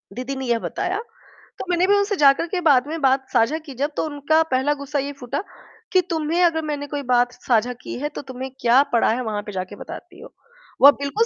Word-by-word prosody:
दीदी 255 +2 -4
ने 265 0 -5
यह 235 -1 +1
बताया, 370 - -3 0.6
तो - - -4
मैंने 355 +1 +2
भी 405 - +5
उनसे 405 0 +1
जाकर 285 0 +4
के 360 +1 -2
बाद 280 -5 +4
में 325 +2 -4
बात 265 0 +2
साझा 245 +5 +2
की 275 - -8
जब 290 - 0
तो - - +1
उनका 305 +1 +1
पहला 265 +3 +2
गुस्सा 285 +1 -2
ये 280 +1 -3
फूटा 270 +6 -4 0.5
कि 370 - +5
तुम्हें 325 +1 0
अगर 330 -2 +3
मैंने 290 -1 -4
कोई 290 0 -4
बात 245 0 +3
साझा 245 -1 0
की - - -6
है 295 +2 -2
तो - - -4
तुम्हें 260 +1 -6
क्या 245 +3 +5
पड़ा 235 - +3
है 240 +3 -1
वहाँ 215 -3 -3
पे 210 - -6
जाकर 185 +1 -5
बताती - - -10
हो? - - -13 0.5
वो 280 - +10
बिल्कुल 280 +12 -1
280 Hz, 230 wpm, -22 LUFS, 250-315 Hz, 0.6 s, वो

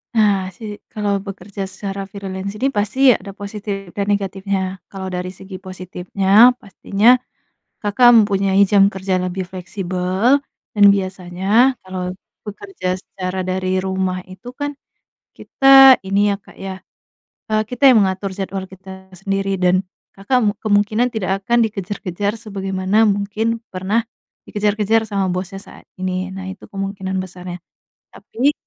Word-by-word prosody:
Nah, 200 -4 +2
si - - -13 0.3
kalau 200 -2 -1
bekerja 200 0 -6
secara 195 0 -5
freelance 195 -1 -6
ini, 270 - +2
pasti 210 +5 -1 0.2
ada 200 - -8
positif, 200 -2 -6
dan 200 -1 -1
negatifnya. 195 -1 -2
Kalau, 190 -1 -6
dari 180 0 -4
segi 190 +1 -11
positifnya, 190 +4 +3
pastinya 205 +4 +3 0.7
Kakak 210 +4 +4
mempunyai 200 -2 +3
jam 200 -1 +5
kerja 190 0 -1
lebih 185 +1 -2
fleksibel, 185 +5 0 0.4
dan 205 - +6
biasanya 190 +5 +1
kalau 185 -1 -5 0.3
bekerja 200 -3 -6
secara 185 -1 -5
dari 185 0 0
rumah 190 -1 -2
itu 190 +6 -11
kan, 290 +2 -5 0.6
kita, 270 -1 +7
ini 200 +1 +2
ya, - - 0
Kak, - - -18
ya, 195 -1 -7 0.7
eee, 215 0 +2
kita 250 +4 -8
yang 245 - +6
mengatur 190 +1 -3
jadwal 195 0 -3
kita 190 0 -12
sendiri, 195 +1 -2
dan 180 +1 +3 0.3
Kakak 200 +7 0
mu 205 - +3
kemungkinan 215 +3 +2
tidak 195 -3 -2
akan 235 +1 +3
dikejar-kejar, 200 -1 -3
sebagaimana 195 -1 -1
mungkin, 210 +3 -1 0.2
pernah 205 +5 0 0.4
dikejar-kejar 210 +1 +1
sama 195 -2 0
bosnya, 185 +2 -5
saat 195 - -14
ini, 185 0 -2
nah, 190 0 -7
itu 190 +1 -8
kemungkinan 195 -1 -4
besarnya. 180 -1 -6 0.6
Tapi, 270 +6 -1
195 Hz, 135 wpm, -19 LUFS, 185-210 Hz, 0.7 s, kita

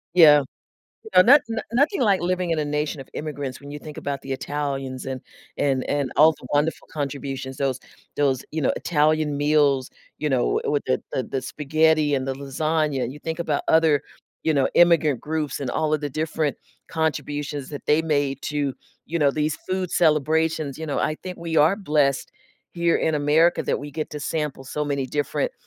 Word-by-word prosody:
Yeah. 150 -4 +8 0.7
No 185 - +9
not 275 +6 +7
no-nothing 245 - 0
like 200 -6 +3
living 180 -1 0
in 160 - +1
a 150 - 0
nation 150 -1 -2
of 135 - -11
immigrants 145 -4 -5
when 140 0 -10
you 145 - -6
think 150 0 -10
about 140 -1 -4
the 135 - -5
Italians 135 -1 -3
and 130 -1 -4 0.4
and 135 -2 +1
and 140 -3 0
all 160 +2 +7
the 125 - -13
wonderful 150 +3 0
contributions, 135 -2 -4
those 135 -3 -1 0.4
those, 135 -3 +1
you 160 - -2
know, - - +2
Italian 155 -2 +1
meals, 145 -3 +2 0.3
you 150 - -1
know, 130 -3 +1
w - - 0
with 145 - 0
the 130 - 0
the 130 - 0
the 130 0 -4
spaghetti 155 +1 +2
and 130 0 -1
the 135 - -1
lasagna, 140 -1 -1
you 145 - -10
think 160 +2 -5
about 155 -4 -1
other, 160 -3 +4 0.4
you 160 - +3
know, 135 -2 +2
immigrant 165 -6 +4
groups 155 -2 -3
and 130 -3 -2
all 155 -1 0
of 150 - -1
the 145 -1 -3
different 155 0 -1 0.3
contributions 145 -3 -2
that 145 - -7
they 150 +2 +4
made 145 -3 0
to, 145 -3 -2 0.3
you 170 +2 -2
know, 145 -2 +4
these 150 +1 -1
food 185 -1 -1
celebrations, 155 -2 +1
you 160 - -5
know, 145 - -2
I 155 - 0
think 180 -1 -6
we 165 -1 -3
are 160 +6 +5
blessed 150 -8 +1 0.4
here 170 -1 +2
in 160 - 0
America 150 +4 +3
that - - -1
we 145 +1 -7
get 155 +2 -4
to 150 -1 -6
sample 150 -4 -3
so 150 +3 -3
many 140 -2 -1
different, 150 - -1
150 Hz, 190 wpm, -23 LUFS, 140-160 Hz, 0.7 s, No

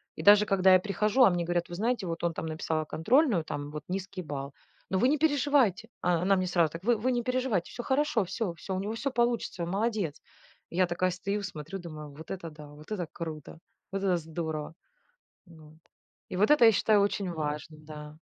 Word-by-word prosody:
И - - -6
даже 205 +1 +7
когда 190 -2 +5
я 185 - +7
прихожу, 210 +6 +2
а 240 - +8
мне 175 -2 -1
говорят: 175 0 -1
"Вы 175 - -6
знаете, 225 +2 0
вот 165 0 -4
он 170 -1 +1
там - - -5
написал 155 0 -2
контрольную 215 - +2
там 145 -1 -5
вот 150 -1 -6
низкий 190 0 -4
балл, 140 -2 -5 0.4
но 190 - +1
вы 250 - +4
не 300 - +3
переживайте!" 280 - +2
О 175 -1 +2
она 195 +2 +3
мне 185 -1 0
сразу: 170 -4 +2
"Вы 235 +2 +3
вы 250 +5 0
не 240 -1 0
переживайте, 250 -8 -1
всё 240 - -6
хорошо, 265 -6 +1
всё, 185 0 -3
всё 190 +3 -5
у - - -1
него 205 +3 -3
всё 265 +5 -2
получится, 235 -7 0
он 170 - -3
молодец!" 205 -6 -1 0.5
Я 185 +2 +2
такая 180 +1 0
стою, 200 +3 -3
смотрю, 180 0 -6
думаю: 155 -4 -8
"Вот 155 +2 -12
это 180 -3 -5
да, 150 -1 -11
вот 150 +5 -14
это 180 -6 -2
круто, 160 -2 -7 0.3
вот 195 - 0
это 185 -3 +3
здорово!" 160 -1 -5 0.8
Ну, 155 -2 -15
вот. 155 - -20 0.5
И - - -4
вот 205 +7 +3
это, 295 -5 +7
я 225 - +7
считаю, 210 +1 +3
очень 200 -2 0
важно, 155 0 -4
да. 150 0 -10
185 Hz, 215 wpm, -29 LUFS, 160-215 Hz, 0.8 s, а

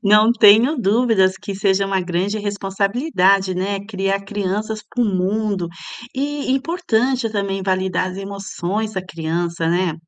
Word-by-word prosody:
Não 210 +3 +5
tenho 230 +6 +6
dúvidas 220 -4 +3
que 200 - -5
seja 195 0 +1
uma 195 -1 0
grande 180 +4 -1
responsabilidade, 200 - +1
né. 195 +2 -2
Criar 195 -2 -1
crianças 210 +2 -3
para 245 - -1
o - - +1
mundo, 195 -1 -1 0.5
e 285 +1 -2
importante 260 -5 0
também 200 -2 -2
validar 185 0 0
as 180 - -8
emoções 195 +1 -4
da 190 - -2
criança, 170 0 -2
né. 175 -1 +1
200 Hz, 135 wpm, -20 LUFS, 190-220 Hz, 0.5 s, tenho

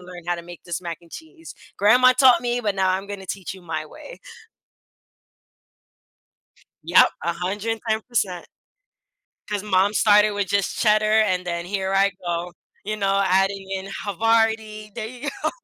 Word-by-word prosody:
learn 180 -1 -11
how 175 0 0
to 170 - -8
make 175 0 -12
this 175 0 -4
mac 170 -2 -5
and 170 - -20
cheese. 325 +1 -11 0.2
Grandma 245 +6 +5
taught 255 -2 +5
me, 245 0 -1
but 205 -3 -1
now 190 -1 +2
I'm 190 +2 -2
gonna 200 -2 -7
teach 190 0 -5
you 190 - -14
my 160 -2 -4
way." - - -12 2.6
Yep, - - +6 0.2
110%. 210 +2 -2 1.0
'Cause 205 -1 -3
mom 200 0 +2
started 210 0 +4
with 205 -1 -2
just 200 +1 -1
cheddar, 215 -1 +3
and 185 -4 0
then 170 -1 -3
here 190 0 -2
I 195 +1 +3
go, 175 0 -3 0.3
you 215 +2 -3
know, 195 -1 +1
adding 195 +1 +1
in 190 0 -4 0.2
Havarti 220 +1 0
there 220 0 -5
you 255 +5 -6
go. - - +2
200 Hz, 155 wpm, -22 LUFS, 185-220 Hz, 2.6 s, Yep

